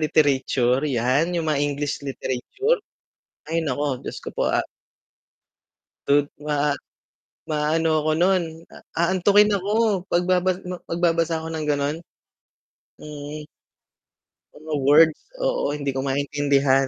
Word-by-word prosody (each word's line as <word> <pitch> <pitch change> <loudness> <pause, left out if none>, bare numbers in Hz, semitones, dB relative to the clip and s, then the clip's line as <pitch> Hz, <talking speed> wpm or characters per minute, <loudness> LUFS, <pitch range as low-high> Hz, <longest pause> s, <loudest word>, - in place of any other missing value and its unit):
literature, 135 -4 +2
'yan. 130 +5 +2
'Yong 165 -1 -1
mga 145 -2 +1
English 145 0 -1
literature, 140 - -1 0.7
ay 165 0 0
naku, 140 -2 -2
Diyos - - -5
ko - - -6
po. - - 0
A - - +1 1.4
tud 145 0 +4 0.2
ma 145 -1 +1 0.7
maano 155 +1 +1
ako 155 - +1
no'n, 185 0 +3 0.3
a - - -11 0.3
aantukin 205 +3 +4
ako, 205 0 +1
pagbabas 180 +1 +2
ma 180 - -3
magbabasa 165 -1 +1
ako 160 - -7
ng 155 -1 -3
gano'n. 145 +1 0 1.1
Mm. 150 0 -8 1.1
Mga 155 -1 -3
words, 155 +2 +6 0.3
oo. - - 0
Hindi 140 -1 -3
ko - - -1
maintindihan. 140 -1 +2
150 Hz, 115 wpm, -23 LUFS, 140-175 Hz, 1.4 s, words